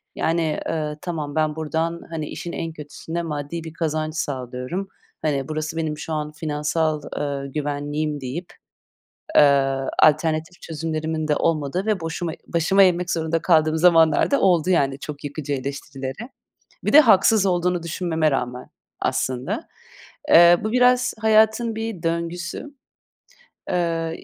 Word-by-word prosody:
yani, 165 -2 0
ııı, 150 -2 -2
"Tamam, 155 -5 -4
ben 155 -1 +1
buradan, 160 +2 -2
hani, 155 -2 -4
işin 170 - -6
en 165 0 -4
kötüsü 150 +1 -10
ne? 170 - 0
Maddi 155 +1 -4
bir 160 -1 -8
kazanç 155 -1 -2
sağlıyorum. 135 +5 -4 0.3
Hani, 140 -3 -1
burası 155 +1 -4
benim 155 -2 -2
şu 160 - -5
an 150 -1 -3
finansal, 155 0 -1 0.2
eee, 140 -1 -3
güvenliğim," 145 0 -3
deyip, 155 +8 -6 0.8
eee, - - +9 0.6
alternatif 155 +2 +2
çözümlerimin 155 0 -3
de 150 - +2
olmadığı 165 +4 0
ve 210 -4 +1
boşuma 165 0 -3
başımı 175 +4 +3
eğmek 180 -1 +2
zorunda 165 0 0
kaldığım 155 -2 +3
zamanlar 165 - +4
da 280 - +2
oldu, 180 -1 +3
yani, 140 -5 +2
çok 145 0 -8
yıkıcı 145 0 -4
eleştirilere. 135 - -5 0.6
Bir - - -1
de 305 - +10
haksız 215 -4 +5
olduğunu 180 -1 +1
düşünmeme 160 -2 0
rağmen, 125 -1 -3 0.3
aslında. 130 - -2 0.6
Eee, 175 -8 +8
bu 215 - -1
biraz 250 0 +3
hayatın 220 +1 +3
bir 225 -5 -5
döngüsü. 170 - -3 1.0
Eee, 165 -2 -1
160 Hz, 135 wpm, -22 LUFS, 150-175 Hz, 1.0 s, de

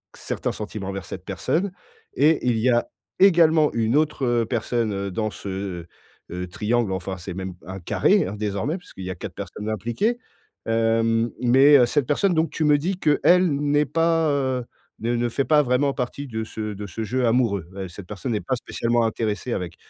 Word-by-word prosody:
certains - - -3
sentiments 105 -2 -6
envers 95 -3 -5
cette - - -8
personne 185 +4 -1 0.4
et 155 -3 +3
il 120 -2 +2
y 125 - +2
a 120 -1 +2 0.3
également 165 -5 +5
une 115 +2 +1
autre 125 -6 +1
personne 110 -4 -1
dans 110 +4 -1
ce, - - -9
heu 95 -3 -5 0.4
heu, 90 +1 -4
triangle, 110 +4 0
enfin, 95 0 -3
c'est 90 +1 -7
même 95 0 -5
un 95 +1 -7
carré, 90 - +2
hein, 100 - -5
désormais 105 - -2
puisqu'il 95 - -11
y - - -4
a - - -5
4 - - -7
personnes 105 +1 -6
impliquées. 120 - -1 0.5
Hem, 115 0 +2
mais 135 +2 +6
cette 145 -4 +1
personne 180 +5 +2
donc, 160 +1 +2
tu 160 - -2
me 150 -1 +5
dis 180 +6 -2
qu'elle 175 +4 +4
n'est 145 +1 +2
pas 165 +1 +2
heu, 130 -3 -1 0.3
ne 120 +2 -1
ne 120 0 0
fait 135 +4 -1
pas 150 -1 +5
vraiment 135 +2 +1
partie 140 +2 -4
de 110 -2 -3
ce 110 -1 -5
de 105 +1 -7
ce 110 - -5
jeu 125 +4 0
amoureux, 110 -8 +1
heu, 95 -1 -5
cette 90 +1 -11
personne 110 +5 -4
n'est 105 - -1
pas 130 - -1
spécialement 120 0 0
intéressée 110 +2 -2
avec 90 -2 -4
120 Hz, 190 wpm, -23 LUFS, 105-145 Hz, 0.5 s, mais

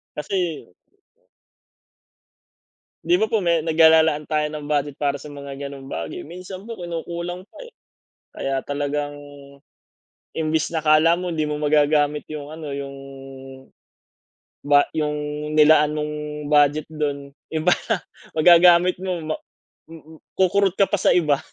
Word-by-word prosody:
Kasi 170 +1 -3 2.4
'Di 170 +2 +3
ba 215 - +2
po 220 -1 0
me 170 -3 +1
nag 160 - -1
ah, 160 - +9
lalaan 150 -2 0
tayo 150 -1 +1
ng 150 -1 -7
budget 145 -1 0
para 145 -1 0
sa 140 - -14
mga 140 -1 -9
gano'ng 140 -1 -8
bagay, - - -5
minsan 180 +3 -9
po 230 - -6
kinukulang 175 +1 -5
pa, - - -18
eh. 480 - -15 0.6
Kaya 135 -1 -3
talagang 145 0 -3 1.2
imbes 155 -1 0
na 160 - -1
'kala 155 +2 +5
mo 180 0 -4
hindi 155 -2 -1
mo 150 - -2
magagamit 150 0 +1
yung 150 -1 -7
ano, 160 -1 -8
yung, 140 0 -6 1.7
ba 145 0 +6
yung 150 -1 -2 0.4
nilaan 150 0 +5
mong 150 0 -3 0.4
budget 145 0 +3
do'n 145 -2 -3 0.2
iba 160 +3 +2 0.2
na. 225 -5 -1 0.3
Magagamit 175 +2 +6
mo 185 0 -3
ma 155 0 -3 0.5
mm, 160 -1 -14 0.2
kukurot 190 0 +2
ka 195 0 +2
pa 205 - +1
sa - - +3
iba. 150 -5 +2
155 Hz, 140 wpm, -22 LUFS, 145-170 Hz, 2.4 s, ah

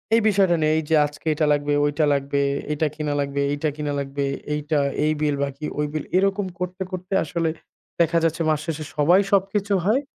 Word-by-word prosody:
এই 230 - +4
বিষয়টা 190 -4 +3
নিয়ে 155 0 +3
এইযে 160 +1 0
আজকে 145 +2 -9
এটা 155 - +1
লাগবে, 145 0 0
ঐটা 150 +1 +1
লাগবে, 140 0 0 0.3
এইটা 150 +1 +1
কিনা 150 -2 -2
লাগবে, 140 0 -1
এইটা 150 +1 -1
কিনা 150 -1 -3
লাগবে, 140 0 -3 0.3
এইটা, 150 0 0 0.3
এই 155 - +2
বিল 150 -2 +1
বাকি, 140 +2 -4
ঐ - - -3
বিল 155 - -2
এরকম 195 +1 +1
করতে, 180 +1 -4
করতে 185 +1 -5
আসলে, 165 -2 -1 0.5
দেখা 170 0 +3
যাচ্ছে 165 0 0
মাস 155 -1 +2
শেষে 160 -2 -3
সবাই 175 +7 +5
সবকিছু 200 +1 +1
হয়। 240 +7 +3
155 Hz, 190 wpm, -23 LUFS, 145-180 Hz, 0.5 s, সবাই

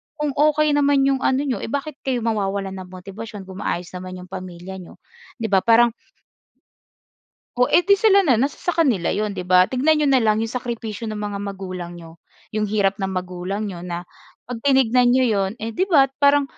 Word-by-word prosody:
kung 300 -2 -2
okey, 300 +1 +3
naman 285 -1 +3
'yong 270 -1 +2
ano 265 +2 +1
n'yo, 250 -8 -2
eh - - -5
bakit 285 +3 -4
kayo 245 -3 0
mawawalan 200 -3 -1
ng 185 - -9
motibasyon 195 +3 -9
kung 190 +1 -10
maayos 175 0 -3
naman 185 0 -7
'yong 180 0 -11
pamilya 185 0 -8
niyo, 180 - -12 0.5
'di 220 - -2
ba? 195 - +5
Parang 230 +2 +4 1.7
O, 250 - +4
eh - - +7
di, 400 0 +6
sila 400 -1 +5
na, 255 -6 +4
nasa 275 +5 -1
sa 355 - -1
kanila 255 - +2
'yon, 210 0 -1
'di 180 - -5
ba? 185 0 +6
Tignan 290 +5 +3
niyo 300 -2 +2
na 260 -2 +4
lang 220 0 +2
'yong 225 - -3
sakripisyo 230 -3 -4
ng 215 - -4
mga 205 -1 -4
magulang 185 -3 -6
niyo, 165 -1 -13 0.3
'yong 215 0 0
hirap 200 -1 +1
ng 195 - -1
magulang 185 +2 -4
niyo 185 -4 -6
na 175 0 -5 0.4
'pag 245 -2 -6
tinignan 255 -3 +4
niyo 260 0 +4
'yon, 195 -3 0
eh 225 +1 -4
di 375 - +2
ba 275 -7 +5
parang 285 0 +5
215 Hz, 205 wpm, -21 LUFS, 190-270 Hz, 1.7 s, eh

